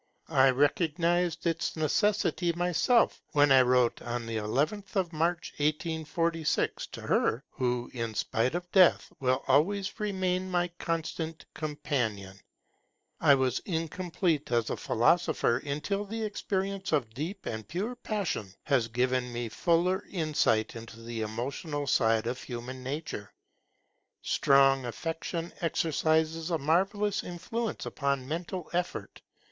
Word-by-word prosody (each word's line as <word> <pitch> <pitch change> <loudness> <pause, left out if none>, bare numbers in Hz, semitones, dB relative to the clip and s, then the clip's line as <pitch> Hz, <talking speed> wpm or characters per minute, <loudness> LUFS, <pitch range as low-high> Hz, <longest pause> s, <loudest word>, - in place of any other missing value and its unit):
I 135 -4 +5
recognized 170 +5 +1
its 165 0 0
necessity 175 +2 +1
myself, 180 +8 +2
when 145 -1 +5
I 135 -1 +8
wrote 125 -1 +3
on 120 0 -3
the 115 -1 -3
11th 155 - -1
of 180 -3 0
March, 170 +2 -1
1846, 160 +1 0
to - - -9
her 120 +5 +1
who, 125 -2 -1
in 115 -3 -3
spite 115 +9 0
of 175 0 -4
death, 185 -3 +5
will 130 0 +1
always 190 - +2
remain 185 -3 -1
my 175 -1 +1
constant 165 -1 -3
companion: 115 -11 -3 0.8
'I 145 -3 +6
was 130 -2 +1
incomplete 165 -3 -1
as 115 -2 +1
a - - 0
philosopher, 130 0 +2
until 150 +9 -2
the 225 +2 -4
experience 195 -2 -2
of 125 -8 0
deep 170 - -5
and 110 -2 -4
pure 200 +9 -2
passion 200 - -3
has 130 -6 +2
given 125 +1 0
me 120 -1 -3
fuller 175 - +1
insight 155 - +1
into 115 0 -9
the 115 0 -5
emotional 135 +7 -3
side 115 -4 +2
of 125 +2 -3
human 125 +1 -6
nature'. 130 - -5 0.9
Strong 135 -1 +4
affection 165 +6 -4
exercises 160 0 +1
a 165 - +1
marvellous 195 +7 +1
influence 205 +6 -4
upon 140 -2 -1
mental 170 +4 -4
effort. 175 0 -3
155 Hz, 125 wpm, -29 LUFS, 125-175 Hz, 0.9 s, I